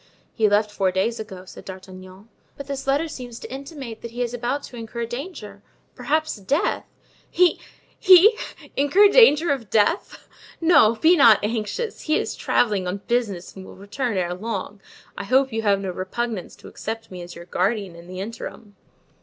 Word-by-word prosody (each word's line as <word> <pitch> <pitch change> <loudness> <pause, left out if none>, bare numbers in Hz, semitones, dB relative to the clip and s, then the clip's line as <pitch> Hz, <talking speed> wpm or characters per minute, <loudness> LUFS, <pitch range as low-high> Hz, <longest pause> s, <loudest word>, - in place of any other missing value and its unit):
"He 215 -2 +2
left 205 +1 +2
four 195 -2 0
days 190 +6 -1
ago," 190 -4 -8
said - - -12
D'Artagnan. 185 +1 -11 0.3
"But 280 - -7
this 275 -1 -6
letter 285 +4 +1
seems 250 -6 -8
to - - -9
intimate 270 -4 -8
that 235 - -7
he 240 +2 -3
is 240 0 -4
about 245 +4 -2
to - - -10
incur 235 0 -5
danger, 235 - -8 0.3
perhaps 300 +3 -1
death." 240 - -1 0.4
"He—he—incur 370 -1 +3
danger 345 -9 +6
of 245 -7 -3
death! 225 - 0 0.3
No, 325 -10 +5
be 320 +10 +5
not 230 - +7
anxious; 225 - -3
he 310 0 +1
is - - -3
traveling 205 -6 +1
on 190 +2 -4
business 215 -7 -2
and 190 - -9
will - - -12
return 205 +3 -3
ere 175 -1 -1
long. 200 0 -5 0.3
I - - -6
hope 260 +3 +2
you 225 - -1
have 200 -2 +2
no 195 -2 -4
repugnance 190 +3 -4
to - - -14
accept 225 0 -6
me 180 -1 -7
as 175 0 -10
your 170 - -10
guardian 190 +1 -1
in 170 +1 -13
the 185 0 -8
interim." 215 -1 -8
225 Hz, 170 wpm, -23 LUFS, 195-275 Hz, 0.4 s, not